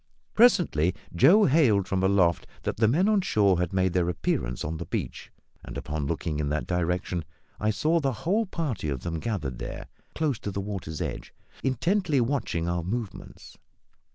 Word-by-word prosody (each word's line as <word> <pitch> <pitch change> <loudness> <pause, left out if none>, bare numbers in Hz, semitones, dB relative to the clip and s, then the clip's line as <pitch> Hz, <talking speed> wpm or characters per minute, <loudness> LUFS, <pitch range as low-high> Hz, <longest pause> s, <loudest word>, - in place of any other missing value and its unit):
Presently, 170 - +4 0.2
Joe 200 - +6
hailed 120 - +3
from 95 0 0
aloft 95 -3 +2 0.2
that - - -2
the 110 0 +4
men 165 - +3
on 215 -2 +3
shore 100 - +2
had 90 -2 -1
made 95 -2 +1
their 90 -1 +1
appearance 60 -7 -2
on 80 +2 -3
the 85 - -6
beach; - - -4 0.3
and, - - -7
upon 75 -1 -3
looking 80 -1 -2
in 75 -1 -1
that 75 +1 -1
direction, 90 0 -1 0.4
I 105 - +1
saw 155 +10 +2
the 140 -3 0
whole 210 +5 +2
party 145 - -3
of 65 -3 -3
them 80 +2 -3
gathered 75 - -3
there, - - -6 0.3
close 150 -7 0
to - - -4
the 100 - -4
water's 95 -6 -5
edge, - - -5 0.3
intently 150 - +1
watching 115 - -1
our 85 0 0
movements. 110 +3 -6
95 Hz, 175 wpm, -27 LUFS, 85-140 Hz, 0.4 s, Joe